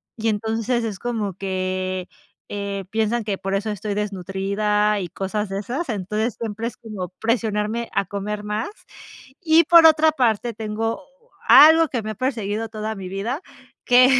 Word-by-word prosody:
y 225 -1 -3
entonces 225 +3 0
es 210 -4 -4
como 220 -5 -2
que, 185 -1 -3 0.4
eh, 200 -1 -4
piensan 220 +2 0
que 205 -2 -2
por 195 +1 -4
eso 200 +2 -1
estoy 210 0 -3
desnutrida 205 +1 0
y 180 - -5
cosas 195 +4 -3
de 195 0 -3
esas, 255 - -4
entonces 215 +2 -2
siempre 225 0 -4
es 235 - -5
como 210 -6 -6
presionarme 225 0 -1
a - - +1
comer 205 +2 -4
más, 210 +2 -2 0.7
y 330 -1 +5
por 335 +1 +8
otra 315 0 +5
parte, 240 -4 +1
tengo 225 +1 -3 0.5
algo 320 +2 +8
que 240 -4 -2
me 215 - -4
ha - - -4
perseguido 225 -3 -2
toda 215 0 -4
mi 190 -2 -7
vida 215 - -3 0.4
que, 250 0 +7
215 Hz, 160 wpm, -22 LUFS, 200-235 Hz, 0.7 s, por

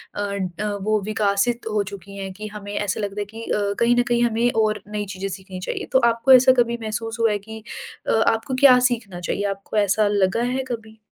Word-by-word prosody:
अ - - -5 0.4
अ, 210 - -1
वो 215 +1 +1
विकसित 215 +3 0
हो 210 -1 +1
चुकी 200 0 -10
हैं 195 -1 -5
कि 210 +2 -7
हमें 205 -1 -7
ऐसा 205 0 -1
लगता 205 0 -3
है - - -3
कि 220 +3 -10
अ, 200 -2 -1
कहीं 235 +1 +4
न - - +4
कहीं 240 0 +2
हमें 235 +1 +2
और 215 -1 0
नई 210 0 -2
चीज़ें 190 +1 -4
सीखनी 190 0 -8
चाहिए। - - -3
तो 260 - +5
आपको 230 +3 +1
ऐसा 260 0 +8
कभी 235 0 -1
महसूस 225 +1 -4
हुआ 225 -2 +3
है 205 - -1
कि 220 +2 -10 0.4
अ, - - +2 0.2
आपको 225 +4 0
क्या 255 -2 +8
सीखना 215 -7 -4
चाहिए? 185 +3 -2
आपको 195 +2 -5
ऐसा 205 +1 +3
लगा 200 +1 +1
है 265 - -1
कभी? 220 -2 -7
215 Hz, 220 wpm, -22 LUFS, 200-230 Hz, 0.4 s, ऐसा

